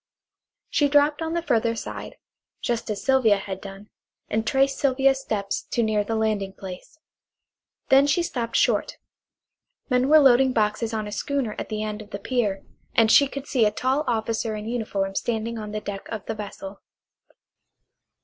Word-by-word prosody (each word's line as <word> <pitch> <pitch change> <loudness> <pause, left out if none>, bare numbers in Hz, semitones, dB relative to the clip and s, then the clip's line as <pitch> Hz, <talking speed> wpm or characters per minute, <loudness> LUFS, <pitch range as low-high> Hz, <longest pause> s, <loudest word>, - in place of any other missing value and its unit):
She 290 -1 +3
dropped 290 +2 +3
on 325 0 -2
the 340 -1 -1
further 230 -5 +1
side, - - -7 0.4
just 235 -2 -2
as 210 -2 -3
Sylvia 255 -6 +4
had 195 -1 -6
done, 195 +1 -10 0.4
and 220 0 -1
traced 270 +2 +2
Sylvia's 270 0 +2
steps 200 -5 -2
to 235 - +1
near 215 -1 +1
the 225 +2 -3
landing 215 -3 -1
place. 190 - -10 0.9
Then 270 +1 +6
she 340 +4 +2
stopped 235 -8 -3
short. - - +2 0.9
Men 250 +2 +2
were 310 - +8
loading 265 -2 +5
boxes 215 +1 0
on 215 -2 -3
a - - -7
schooner 265 -1 -2
at - - -5
the 215 0 -3
end 215 0 -4
of 205 - -12
the 200 - -5
pier, 205 -3 -1 0.3
and 225 -1 +5
she 280 - +7
could 280 0 -7
see 255 -5 +1
a 210 - +5
tall 260 +7 0
officer 225 -1 -1
in 210 +1 -6
uniform 210 -5 -2
standing 230 +2 -2
on 210 -1 -6
the 215 - -3
deck 200 -1 -6
of 220 -3 -5
the 225 - -3
vessel. 200 -2 -8
225 Hz, 175 wpm, -24 LUFS, 210-265 Hz, 0.9 s, were